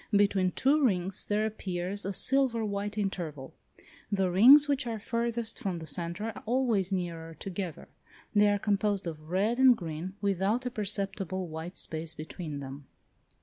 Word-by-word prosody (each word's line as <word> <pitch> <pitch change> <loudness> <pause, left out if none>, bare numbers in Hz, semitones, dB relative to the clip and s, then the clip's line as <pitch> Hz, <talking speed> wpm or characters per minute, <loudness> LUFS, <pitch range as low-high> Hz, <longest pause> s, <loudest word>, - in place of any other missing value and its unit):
Between 200 -2 +3
two 290 +3 +3
rings 190 -5 0
there 210 +1 +1
appears 195 -2 -3
a 195 - -1
silver 245 +1 +2
white 205 0 -3
interval. 165 -9 -3 0.6
The 190 -3 +1
rings 265 +11 +8
which 275 -3 0
are 225 -1 -2
farthest 235 +1 -2
from 190 -4 -2
the 165 - -7
centre 170 +8 -3
are - - -8
always 230 -6 +1
nearer 165 -3 -3
together: 185 -3 -5 0.5
they 210 0 +5
are 205 0 +3
composed 200 -1 0
of 155 -2 -7
red 205 +7 +1
and 260 -3 +7
green 170 +1 -5
without 200 +5 0
a 250 - -2
perceptible 195 -4 -2
white 160 +3 -7
space 160 0 -4
between 155 -2 -6
them. 135 0 -8
195 Hz, 155 wpm, -29 LUFS, 175-220 Hz, 0.6 s, rings